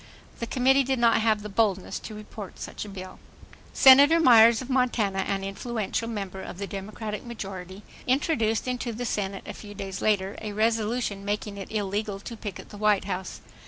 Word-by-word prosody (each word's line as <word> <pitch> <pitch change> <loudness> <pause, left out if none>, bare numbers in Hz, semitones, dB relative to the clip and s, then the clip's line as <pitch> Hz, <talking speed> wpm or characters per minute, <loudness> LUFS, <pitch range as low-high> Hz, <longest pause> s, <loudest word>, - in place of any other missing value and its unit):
The 235 - -3
committee 265 +3 +3
did 265 0 0
not 230 -1 +4
have 215 -2 +2
the - - -5
boldness 200 -3 0
to 215 - -9
report 210 -2 -9
such - - -6
a - - -9
bill. 185 -1 -9 0.5
Senator 285 +5 +8
Myers 235 -6 +7
of 255 - -6
Montana, 245 -7 +1
an 195 0 -1
influential 215 +2 -3
member 195 -4 -5
of 185 - -8
the 200 - -4
Democratic 210 +2 -6
majority, 195 -4 -7 0.2
introduced 250 -5 +1
into 250 -1 -2
the 245 +3 -4
Senate 195 -3 -2
a - - -6
few 205 -1 -10
days 195 -1 -5
later 200 -2 0
a 215 -2 -5
resolution 220 -1 0
making 205 0 -3
it 195 - -8
illegal 205 -1 -2
to 230 +3 -8
picket 205 -4 -7
the 205 - -10
White 210 -2 +3
House. 185 -1 -5
210 Hz, 180 wpm, -26 LUFS, 195-235 Hz, 0.5 s, Senator